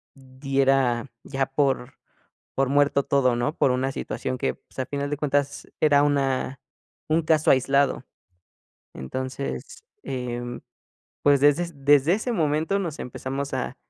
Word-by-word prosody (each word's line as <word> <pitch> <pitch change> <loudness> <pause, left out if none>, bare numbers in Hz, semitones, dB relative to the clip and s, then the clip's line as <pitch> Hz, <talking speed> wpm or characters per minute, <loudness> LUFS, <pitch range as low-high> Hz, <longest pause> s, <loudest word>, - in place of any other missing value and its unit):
diera 135 -2 0 0.2
ya 135 -1 -1
por 135 -2 0 0.6
por 135 -1 +1
muerto 140 0 +3
todo, 130 -3 +2
¿no? 120 +5 -1
Por 130 - +3
una 130 +1 0
situación 130 -1 -4
que, - - -1
pues, - - -15
a 130 - 0
final 140 +1 -3
de 145 - -2
cuentas, 145 -1 -1
era 145 -2 +5
una 135 -2 0 0.5
un 160 +2 +3
caso 155 0 +3
aislado. 135 0 +2 0.9
Entonces, 135 - -5 0.2
em, 120 -1 -4 0.6
pues, 140 -1 +4
desde 145 +4 +4
es 145 -6 -12
desde 145 +3 +5
ese 220 +4 -2
momento 160 +1 +1
nos 170 -6 -4
empezamos 135 +3 -5
a - - -3
140 Hz, 140 wpm, -25 LUFS, 130-145 Hz, 0.9 s, era